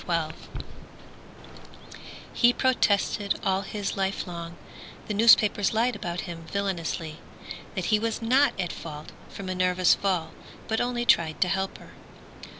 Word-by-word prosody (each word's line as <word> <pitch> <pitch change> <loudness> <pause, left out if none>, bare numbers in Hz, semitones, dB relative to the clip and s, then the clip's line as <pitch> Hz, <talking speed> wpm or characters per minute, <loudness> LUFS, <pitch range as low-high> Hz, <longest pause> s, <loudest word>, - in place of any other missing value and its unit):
Meyers 165 -3 0 2.0
He 240 0 +4
protested 205 -5 +1
all 190 0 +1
his 200 0 -4
life 195 0 -1
long 170 -1 -7 0.5
The 210 - -2
newspapers 210 -1 +5
lied 235 +2 +2
about 175 0 -4
him 165 -2 -8
villainously; 170 -5 -3 0.6
That 185 - -2
he 210 - +5
was 225 +1 -2
not 255 +1 +2
at 175 -2 -2
fault 150 -2 -8 0.2
for 200 - -8
Minerva's 185 -1 +2
fall, 180 -5 -1 0.4
But 220 - 0
only 245 0 -1
tried 160 -8 +3
to 180 - +4
help 190 +1 -2
her. - - -15
195 Hz, 135 wpm, -26 LUFS, 170-215 Hz, 2.0 s, newspapers